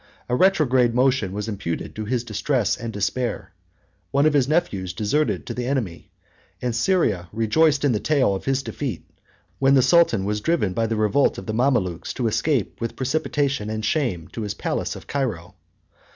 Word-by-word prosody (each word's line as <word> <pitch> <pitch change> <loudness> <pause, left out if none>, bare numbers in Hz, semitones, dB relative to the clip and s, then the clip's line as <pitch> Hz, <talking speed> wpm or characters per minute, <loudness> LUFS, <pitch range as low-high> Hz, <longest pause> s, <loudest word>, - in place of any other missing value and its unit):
A 125 - 0
retrograde 130 -9 +3
motion 125 -6 +2
was 105 +2 -4
imputed 100 -6 -4
to 110 - -4
his 120 +2 -1
distress 115 -1 0
and 115 0 -6
despair: 115 +4 -2 0.6
one 140 +2 +2
of 155 - +4
his 135 -3 +3
nephews 105 - 0
deserted 105 - 0
to - - -5
the 125 0 -3
enemy; 120 -11 -3 0.5
and 125 -2 -2
Syria 115 - +1
rejoiced 140 +7 +2
in 140 - +3
the 105 - 0
tale 135 -6 +2
of 95 - -5
his 135 0 0
defeat, 135 -4 -5 0.5
when 135 0 +4
the 130 - +5
sultan 165 - +4
was 105 +1 -1
driven 155 - +1
by 115 +1 0
the 110 - -1
revolt 110 +6 +2
of - - -7
the 110 - -3
Mamalukes 110 -9 0
to 125 - -2
escape 110 - 0
with 115 - -3
precipitation 140 -4 -1
and 110 0 -3
shame 110 - -1
to 115 - -6
his 105 -2 -3
palace - - -2
of - - -10
Cairo. 105 -11 -3
120 Hz, 180 wpm, -23 LUFS, 105-140 Hz, 0.6 s, the